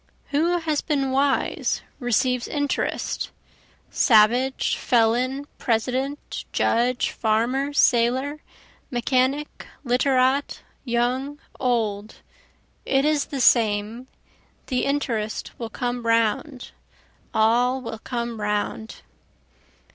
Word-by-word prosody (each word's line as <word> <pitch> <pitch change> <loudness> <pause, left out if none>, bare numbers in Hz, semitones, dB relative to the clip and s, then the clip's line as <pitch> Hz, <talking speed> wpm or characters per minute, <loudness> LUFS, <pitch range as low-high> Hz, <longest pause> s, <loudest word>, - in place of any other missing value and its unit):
Who 325 +5 +2
has 315 -3 -1
been 275 -4 -1
wise 275 +1 0 0.2
receives 250 0 +1
interest, 285 -2 -2 0.6
Savage, 245 +3 +3
felon, 250 +4 +1
President, 260 +4 -2
judge, 245 +2 +1
farmer, 240 +6 0
sailor, 260 +3 +2 0.5
mechanic, 260 +3 -1 0.2
literat, 260 +2 +1 0.2
young, 255 +4 -1 0.2
old, 220 -4 -1 0.7
it 270 +1 +1
is 300 -2 +2
the 275 - -5
same, 225 0 +2 0.6
The 255 -2 -1
interest 235 -7 -2
will 230 -2 -4
come 245 +1 -3
round 230 +4 0 0.6
all 240 +4 +2
will 230 -3 -7
come 235 -2 -4
round. 210 +1 -3
250 Hz, 85 wpm, -23 LUFS, 230-275 Hz, 0.7 s, Savage